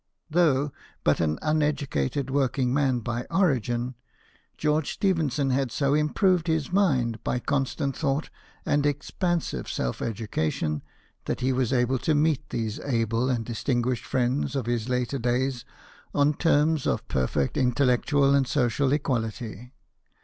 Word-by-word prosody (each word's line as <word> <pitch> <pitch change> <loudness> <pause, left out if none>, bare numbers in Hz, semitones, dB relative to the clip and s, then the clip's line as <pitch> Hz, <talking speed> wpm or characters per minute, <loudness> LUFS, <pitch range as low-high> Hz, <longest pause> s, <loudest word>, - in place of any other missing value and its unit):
Though 150 -4 +3 0.3
but - - +3
an 80 -2 +1
uneducated 145 - 0
work 135 -2 +1
ing 125 -2 +1
man 135 -4 +1
by 120 +2 -3
origin, 130 - +1 0.6
George 150 0 0
Stephenson 150 -8 +1
had 130 -1 0
so 140 +2 +1
improved 170 +4 +2
his 160 -2 0
mind 130 - +1
by - - 0
constant 135 +1 -1
thought 145 0 -1 0.3
and 145 0 +2
expansive 170 +4 -2
self 60 - -2
education, 80 -9 -2 0.4
that - - -3
he 130 +1 +2
was 125 -2 0
able 125 0 +2
to 155 - +1
meet 150 -1 +1
these 110 -2 -3
able 115 -1 0
and 120 -3 -1
distinguished 120 +1 -1
friends 130 +3 0
of 135 -4 -1
his 120 0 -1
later 125 +2 -1
days 125 +1 0 0.5
on 145 +1 +4
terms 155 -1 +2
of - - -1
perfect 65 +2 0
intellectual 135 +2 +3
and 140 -2 +3
social 130 0 +1
equality. 120 -4 -3
130 Hz, 135 wpm, -26 LUFS, 120-145 Hz, 0.6 s, on